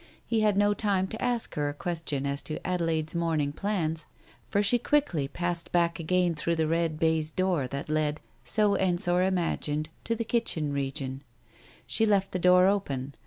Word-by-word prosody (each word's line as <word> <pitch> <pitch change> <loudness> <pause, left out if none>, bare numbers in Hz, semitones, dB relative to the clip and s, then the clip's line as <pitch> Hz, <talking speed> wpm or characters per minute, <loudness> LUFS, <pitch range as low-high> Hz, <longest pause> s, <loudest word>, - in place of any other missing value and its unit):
He 225 -2 0
had 210 -2 +2
no 205 0 +4
time 200 -2 0
to 220 - -6
ask 245 -2 0
her 145 -1 -1
a 145 - -6
question 160 -4 -2
as 140 0 -1
to 155 - -5
Adelaide's 165 -3 0
morning 165 -4 0
plans, 165 -5 -2 0.4
for 205 - +2
she 240 +4 +3
quickly 240 - +1
passed 175 +2 -2
back 170 -1 +1
again 180 +1 +1
through 170 +2 -1
the 160 -1 +1
red 165 0 0
baize 160 -1 +1
door 175 -5 0
that 140 +2 -5
led, 155 0 0 0.2
so 200 - +3
Ensor 175 -1 +2
imagined, 165 -4 -1 0.2
to 230 - 0
the 230 0 -3
kitchen 160 -11 0
region. 135 -1 -3 0.6
She 220 - +2
left 195 -2 +2
the 185 - -2
door 180 +1 +6
open. 140 -9 -1
170 Hz, 175 wpm, -28 LUFS, 155-190 Hz, 0.6 s, door